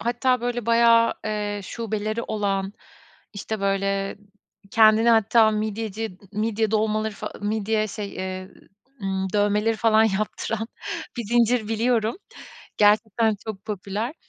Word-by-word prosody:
hatta, 245 +1 +1
böyle, 240 -1 -3
bayağı, 230 0 +5
eee, 210 -1 -2
şubeleri 215 +1 -3
olan, 200 -2 -2 0.6
işte, 215 0 -5
böyle, 195 0 -1 0.5
kendini 220 0 +5
hatta 220 0 +5
midyeci 215 -2 -3
midye 215 0 0
dolmaları 215 0 0
fa - - -6
midye 215 +1 0
şey, 205 0 -6
eee, 185 0 -5 0.5
ımm, 190 -1 -2
dövmeleri 210 +2 +2
falan 220 0 +4
yaptıran 215 +2 -2 0.5
bir 235 - -2
zincir 235 0 +2
biliyorum. 225 +1 +1 0.6
Gerçekten 215 +1 +3
çok 200 -3 -6
popüler. 210 - -4
215 Hz, 115 wpm, -24 LUFS, 205-225 Hz, 0.6 s, bayağı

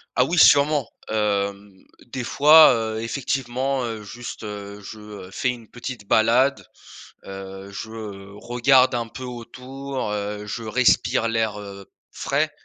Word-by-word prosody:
Ah 125 - +4
oui 170 +6 -2
sûrement. 145 -3 +5 0.2
Hem, 100 -2 -1 0.3
des 125 0 -5
fois, 150 +3 +7
heu, 110 -1 -2
effectivement, 130 +1 -2
heu, 110 -2 -5
juste, 120 +2 -8
heu, 100 -1 -7
je, 110 +2 -10
heu, 105 -3 -10
fais 125 - -1
une 120 -3 -6
petite 120 -3 -7
balade, 120 +7 +3 0.6
heu, 95 0 -9
je, 110 +3 -7
heu, 100 -3 -9
regarde 125 +3 +3
un 115 -1 -2
peu 120 - -10
autour, 130 +1 -6
heu, 105 0 -4
je 115 +2 -5
respire 115 0 +2
l'air, 110 -2 -1
heu, 100 -2 -10 0.2
frais, - - -1
115 Hz, 140 wpm, -23 LUFS, 105-125 Hz, 0.6 s, fois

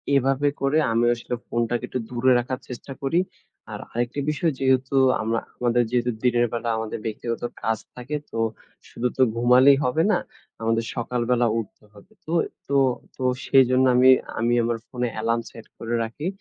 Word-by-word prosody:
এভাবে 135 +2 +2
করে 135 +3 +2
আমিও 120 +1 +3
আসলে 120 +1 -5
ফোনটাকে 120 0 -1
একটু 130 - -2
দূরে 125 +1 +2
রাখার 130 +2 -3
চেষ্টা 125 +2 -7
করি। 165 +6 +2 0.5
আর - - -6
আরেকটি 120 +4 -2
বিষয় 160 +1 0
যেহেতু 130 0 +1 0.3
আমরা 115 +1 0 0.2
আমাদের 120 0 +2
যেহেতু 125 0 +1
দিনের 120 -1 +3
বেলা 120 0 -2
আমাদের 110 0 -4
ব্যক্তিগত 115 +1 -4 0.2
কাজ 115 0 +1 0.2
থাকে 125 +4 -5 0.2
তো 115 - -4 0.5
শুধু 125 - -2
তো 130 - +5
ঘুমালেই 125 +4 +6
হবে 155 +6 +2
না। 190 - +2 0.4
আমাদের 115 0 0
সকালবেলা 120 0 0
উঠতে 105 0 -9
হবে। 105 - -18
তো 160 - -6 0.4
তো 140 - -1 0.4
তো 130 - -5 0.2
সেইজন্য 130 -1 +4
আমি 130 +1 +6 0.3
আমি 120 +1 +1
আমার 115 0 0
ফোনে 125 -1 -2
অ্যালার্ম 115 +1 0
সেট 115 -1 -13
করে 115 +1 -3
রাখি। 115 +9 -5
120 Hz, 165 wpm, -24 LUFS, 115-130 Hz, 0.5 s, ঘুমালেই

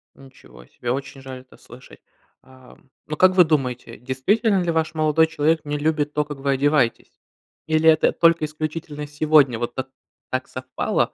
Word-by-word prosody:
Ничего 65 - -17
себе! 120 -1 -5
Очень 135 0 -5
жаль 130 -1 -9
это 130 - -20
слышать! 125 +2 -16 0.4
Ам, 130 0 -19 0.2
но 155 - -4
как 185 0 +4
вы 180 - +7
думаете, 135 -6 -2
действительно 190 - 0
ли 170 - 0
ваш 160 0 -1
молодой 155 +1 +2
человек 160 0 0
не 145 0 -3
любит 150 -1 -1
то, 150 - +1
как 145 -1 -8
вы 140 0 -1
одеваетесь? 140 -3 +1 0.6
Или 160 0 +3
это 155 -1 +4
только 165 -2 +3
исключительно 155 -1 -6
сегодня 150 -5 +3
вот 120 0 -4
так 130 0 -5 0.4
так 130 0 -3
совпало? 130 0 -2
145 Hz, 165 wpm, -22 LUFS, 130-155 Hz, 0.6 s, вы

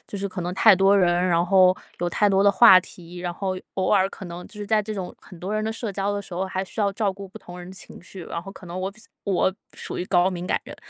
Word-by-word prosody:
就 - - -6
是 200 0 -3
可 185 -1 -6
能 175 +1 -3
太 190 - +7
多 195 +2 +4
人， 175 -3 +4 0.2
然 170 0 +2
后 185 0 +5 0.2
有 175 - -1
太 205 +4 +2
多 195 0 +3
的 200 - +6
话 195 -2 +8
题， 175 0 -11
然 175 0 -3
后 190 -1 -3 0.2
偶 190 - -1
尔 195 -2 +4
可 190 - -10
能 175 +1 -8
就 - - -13
是 210 -1 -6
在 215 0 +3
这 215 +1 -5
种 185 -3 -6
很 180 - -14
多 190 +5 -4
人 215 0 -1
的 220 - -2
社 225 -1 -4
交 200 +1 -1
的 205 - -2
时 190 - -12
候， 185 - -1
还 190 0 -3
需 215 - -6
要 200 -1 +1
照 200 -1 0
顾 195 0 -10
不 - - -12
同 175 0 -11
人 180 0 -9
的 - - -10
情 - - -12
绪， 185 -1 -9
然 170 - -5
后 195 - -9
可 185 - -13
能 175 +2 -6
我 190 - -2
比 215 +2 -12
较 230 - -15 0.2
我 190 -1 +1 0.2
属 - - -5
于 180 - -2
高 185 0 +2
敏 180 0 -5
感 - - 0
人， - - -10
190 Hz, 330 characters per minute, -24 LUFS, 180-200 Hz, 0.2 s, 话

